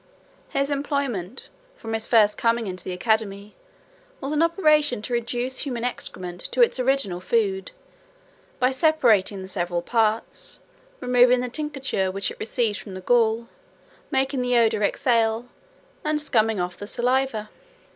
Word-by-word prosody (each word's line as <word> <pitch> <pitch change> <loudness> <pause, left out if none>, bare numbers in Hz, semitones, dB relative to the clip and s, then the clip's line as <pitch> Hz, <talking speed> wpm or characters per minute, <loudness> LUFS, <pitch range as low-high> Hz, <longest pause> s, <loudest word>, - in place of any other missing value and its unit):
His 275 +1 0
employment, 275 -7 -3 0.3
from 225 - -7
his 220 0 -2
first 210 -3 +4
coming 230 0 +1
into 185 -2 -6
the - - -5
academy, 205 +1 -1 0.7
was 275 - -4
an 305 +1 +1
operation 305 - +3
to 245 - -4
reduce 240 +2 -2
human 245 -5 -3
excrement 180 -7 -5
to - - +5
its 460 - +1
original 255 -8 0
food, 410 - 0 0.9
by 255 +1 +2
separating 235 - +2
the - - -8
several 175 -2 -2
parts, 225 - -1 0.4
removing 250 0 +4
the 250 - -3
tincture 270 -8 -2
which 195 +1 -2
it - - -12
receives 220 -1 0
from 195 -3 -9
the 185 - -7
gall, 230 +2 +2 0.6
making 265 0 0
the 250 -1 +2
odour 225 -2 +3
exhale, 230 +2 +1 0.6
and 305 0 0
scumming 225 -7 +1
off 180 0 -3
the 205 - -8
saliva. 245 -2 0
235 Hz, 145 wpm, -24 LUFS, 210-270 Hz, 0.9 s, to